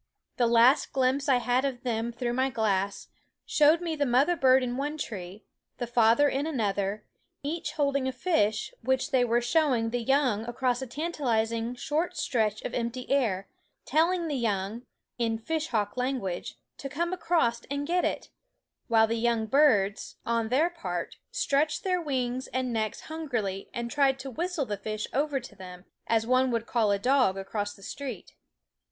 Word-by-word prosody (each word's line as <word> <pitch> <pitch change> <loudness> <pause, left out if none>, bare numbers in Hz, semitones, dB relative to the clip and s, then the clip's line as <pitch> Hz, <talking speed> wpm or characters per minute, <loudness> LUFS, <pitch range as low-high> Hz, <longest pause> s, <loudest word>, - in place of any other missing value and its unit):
The 240 - +3
last 235 +4 +4
glimpse 270 +2 +1
I 265 - +6
had 245 +1 +1
of 260 -3 -3
them 235 -1 -1
through 240 0 -3
my 260 +2 +1
glass 200 -4 -1 0.4
showed 310 +3 +4
me 335 -2 -2
the 290 - 0
mother 270 +8 +3
bird 260 -3 +4
in 245 -1 -2
one 290 +3 -2
tree, 200 -6 -6 0.3
the 245 - -2
father 235 +3 +4
in 280 +2 -1
another, 205 -6 -1 0.4
each 320 +4 -3
holding 280 -3 +1
a - - 0
fish, 220 - 0
which 260 +4 0
they 260 -2 +4
were 240 0 +2
showing 240 -4 +2
the 245 0 -1
young 255 -4 +2
across 245 +1 -1
a 265 - -4
tan 305 +8 -3
talizing 230 -4 -1
short 325 +7 -1
stretch 215 -3 0
of - - -4
empty 245 +2 -3
air, 215 -9 +1 0.4
telling 340 +2 +2
the 300 - -2
young, 220 -3 -1 0.4
in 225 -1 0
fishhawk 230 -6 -2
language, 250 -8 -2 0.2
to 275 - -5
come 340 +6 -2
across 320 -10 +1
and 280 +1 -2
get 355 +3 +1
it; - - -2 0.6
while 225 -2 +5
the 230 +1 -1
young 230 -1 +1
birds, 220 -7 +2
on 230 -1 0
their 305 +8 +2
part, 335 -1 -5
stretched 300 +5 0
wings 265 -9 -1
and 255 -2 -2
necks 220 -1 -2
hungrily 240 -12 -4
and 235 0 -4
tried 275 -2 +3
to 270 0 -7
whistle 340 +1 -2
the 205 -4 -3
fish 215 +2 -4
over 285 0 +1
to 245 - -12
them, 180 -1 -11 0.2
as 225 -1 +2
one 255 +2 +3
would 230 -1 -1
call 230 -3 +1
a 200 - +3
dog 250 -3 +2
across 205 +1 -3
the 195 - -17
street. 255 -3 -7
250 Hz, 170 wpm, -28 LUFS, 225-280 Hz, 0.6 s, I